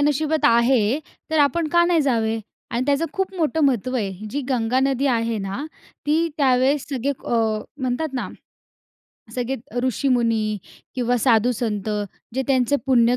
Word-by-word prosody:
नशिबात 300 +2 +1
आहे 235 +1 +4 0.3
तर 315 - +2
आपण 310 +3 +2
का 345 +2 +4
नाही 345 -2 +3
जावे? 225 -5 +1 0.3
आणि 240 +1 0
त्याचं 285 +3 +2
खूप 385 0 -2
मोठं 320 -2 0
महत्त्व 255 -2 +1
आहे. 200 -2 -3
जी 285 - -2
गंगा 250 -1 +1
नदी 270 0 +1
आहे 230 -3 +1
ना, 195 +7 -4 0.4
ती 320 +3 +2
त्यावेळेस 270 0 +2
सगळे 275 -1 -1
अ, 235 - +1 0.4
म्हणतात 260 +4 -1
ना, 255 - -3 1.1
सगळे 255 +1 -2 0.2
अ, 245 - -3
ऋषीमुनी 230 -4 +1 0.4
किंवा 245 -1 +1
साधुसंत 225 -3 +1 0.5
जे 265 - 0
त्यांचं 260 0 +2
पुण्य 245 -2 +4
255 Hz, 145 wpm, -22 LUFS, 230-285 Hz, 1.1 s, आहे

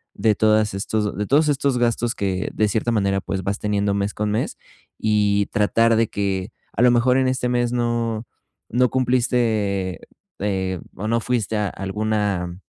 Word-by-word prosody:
de 110 -2 +2
todas 110 -1 +3
estos 105 +1 -2
de 105 0 -2
todos 150 +2 +3
estos 140 -2 +1
gastos 120 0 0
que 95 -1 -2
de 110 - +2
cierta 110 +3 0
manera, 100 -3 +1
pues, 95 0 -4
vas 100 +2 -2
teniendo 100 -1 0
mes 100 0 -1
con 105 0 -1
mes 110 - -2 0.4
y 105 -2 +2
tratar 115 +2 +3
de 115 0 +3
que 100 0 -2 0.2
a - - -1
lo 125 - +7
mejor 125 +2 +3
en 130 -1 +2
este 130 -1 0
mes 120 -1 0
no 115 -2 -1 0.4
no 125 +2 +2
cumpliste, 115 -7 0 0.4
eh, 95 -3 -1 0.2
o 105 - -4
no 115 +1 +2
fuiste 115 -2 -1
a 105 -1 0
alguna 100 -3 -2
110 Hz, 170 wpm, -22 LUFS, 100-120 Hz, 0.4 s, lo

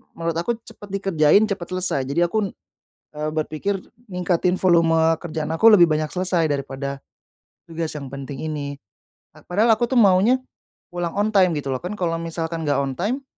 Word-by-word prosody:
menurut 165 -1 -2
aku 170 +8 0
cepet 210 -2 -13
dikerjain, 190 +2 +4
cepet 195 -5 -4
selesai. 185 -7 -1
Jadi 140 +5 -2
aku, 205 +1 -1 0.6
eee, 150 0 -2
berpikir 155 +5 -2 0.3
ningkatin 180 -1 0
volume 170 -3 +4 0.2
kerjaan 160 -2 -4
aku 165 +8 +4
lebih 175 -4 +8
banyak 155 0 0
selesai 180 -3 0
daripada 140 -1 -4 0.7
tugas 165 -1 -4
yang 140 -2 -6
penting 140 0 -7
ini. 145 -2 -4 0.6
Pa - - -17
padahal 220 +5 +3
aku 240 +2 0
tuh 255 - +3
maunya 205 +5 +5 0.5
pulang 175 0 -3
on 205 +1 +1
time, 185 -4 +4
gitu 140 -2 -4
loh. 130 - -2
Kan 195 +4 -4
kalau 165 -2 0
misalkan 165 0 -4
nggak 145 - +2
on 135 -1 -3
time, 250 +9 -1
170 Hz, 170 wpm, -22 LUFS, 155-195 Hz, 0.7 s, lebih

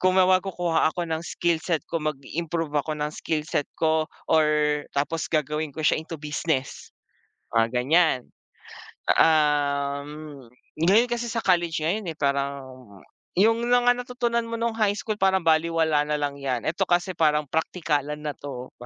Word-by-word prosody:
kumawa 185 0 +4
kukuha 175 -4 0
ako 175 - -3
ng 160 0 -1
skill 170 -1 0
set 165 -2 -1
ko 165 - -2
mag-improve 155 +2 -3
ako 145 +2 0
ng 150 0 -1
skill 155 0 -2
set 145 -2 -1
ko 160 -1 +2 0.2
or 160 -1 +4 0.5
tapos 160 +3 -1
gagawin 150 0 -1
ko 160 - -4
siya 155 - +3
into 165 +1 -7
business? 150 -2 -3 0.6
Mga 115 0 +3 0.2
ganyan. 160 0 +3 0.9
Um, 145 -2 +2 0.7
ngayon 195 +9 +4
kasi 240 0 -2
sa 230 0 -2
college 175 -3 +2
ngayon, 205 +5 -1
eh, 160 - -7
parang 140 -1 -1 0.7
yung 225 +4 +3
mga 245 0 +4
natutunan 240 -2 -1
mo 230 - -4
nung 230 0 -1
High 215 -2 +1
School 215 -1 -4
parang 190 -1 +3
balewala 160 -1 +3
nalang 145 -1 -2
yan. 130 -4 -2
Ito 180 +4 0
kasi 175 +1 +1
parang 150 -2 +2
praktikalan 150 -3 -1
na 150 - -2
'to. 130 -3 -8
160 Hz, 150 wpm, -25 LUFS, 150-185 Hz, 0.9 s, kumawa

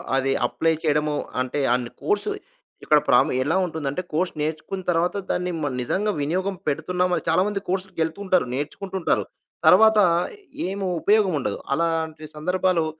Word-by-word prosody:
అవి 135 0 +1 0.2
అప్లై 140 +7 +1
చేయడము, 150 -1 +1 0.3
అంటే 130 +3 -2
అన్ని 125 -1 -1
కోర్సు 415 0 0 0.5
ఇక్కడ 150 - +5
ప్రము 125 - +4
ఎలా 145 +5 0
ఉంటుందంటే 160 -2 -3
కోర్స్ 175 +4 0
నేర్చుకున్న 160 +5 -3
తర్వాత 175 +2 +1 0.2
దాన్ని 180 0 -1
మ - - +1
నిజంగా 205 - 0
వినియోగం 185 +7 -1
పెడుతున్నామా? 180 +4 0
చాలామంది 195 +5 +2
కోర్సులకెళ్తుంటారు, 185 0 0
నేర్చుకుంటుంటారు. 170 +7 -2 0.4
తర్వాత 220 -1 +7 0.7
ఏమి 195 +1 -3 0.2
ఉపయోగం 205 -3 +3
ఉండదు. 105 -6 -2 0.2
అలాంటి 160 0 -1
సందర్భాలు, 180 +1 +1
165 Hz, 125 wpm, -23 LUFS, 150-190 Hz, 0.7 s, తర్వాత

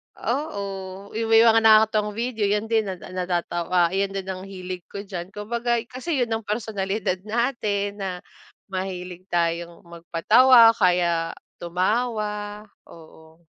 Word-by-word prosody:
Oo, 200 -8 -4
yung 225 0 -2
may 225 0 +7
mga 225 -1 +6
nakakatuwang 215 -1 +4
video 230 -2 -1
yun 210 +2 0
din 220 -2 +1
na 190 - -3 0.2
natatawa 175 -1 0
yun 195 0 +1
din 195 - -3
ang 185 -1 -4
hilig 185 -2 -7
ko 200 0 -6
diyan 180 -2 -6
kumbaga 235 +4 -2
kasi 285 +6 -3
yun 230 - -5
ang 225 -1 -3
personalidad 205 -3 -2
natin 210 -4 -1
na 190 - -2 0.6
mahilig 185 -1 -5
tayong 170 0 -1
mag-patawa 225 +9 +5
kaya 175 -4 +1 0.2
tumawa, 210 +3 -2 0.2
oo. 160 0 -16
200 Hz, 130 wpm, -24 LUFS, 180-225 Hz, 0.6 s, may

